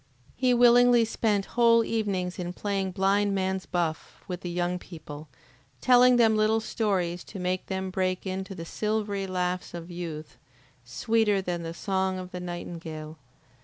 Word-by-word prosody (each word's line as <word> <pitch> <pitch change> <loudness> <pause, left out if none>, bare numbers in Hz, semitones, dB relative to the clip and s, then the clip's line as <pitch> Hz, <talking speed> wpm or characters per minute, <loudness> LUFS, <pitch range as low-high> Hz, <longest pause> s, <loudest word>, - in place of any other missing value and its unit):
He 255 0 +2
willingly 245 -1 +6
spent 210 -3 0
whole 230 -1 +5
evenings 195 -6 -2
in 175 0 -4
playing 195 -1 -2
blind 200 +2 +2
man's 190 0 -1
buff 170 -3 -3
with 180 -1 -5
the 175 - -5
young 175 +1 -1
people, 155 -4 -10 0.5
telling 250 0 +6
them 225 -2 +4
little 215 +1 +3
stories 185 -6 -1
to 205 - -9
make 185 0 -2
them 190 -1 -3
break 185 0 -1
into 190 +1 -4
the 165 - -7
silvery 210 0 -2
laughs 180 -1 -2
of 170 +1 -8
youth, 155 -6 -7 0.5
sweeter 205 - +1
than 175 -2 -3
the 165 0 -6
song 190 0 -1
of 185 0 -7
the 180 - -5
nightingale. 165 -3 -7
190 Hz, 155 wpm, -27 LUFS, 175-215 Hz, 0.5 s, willingly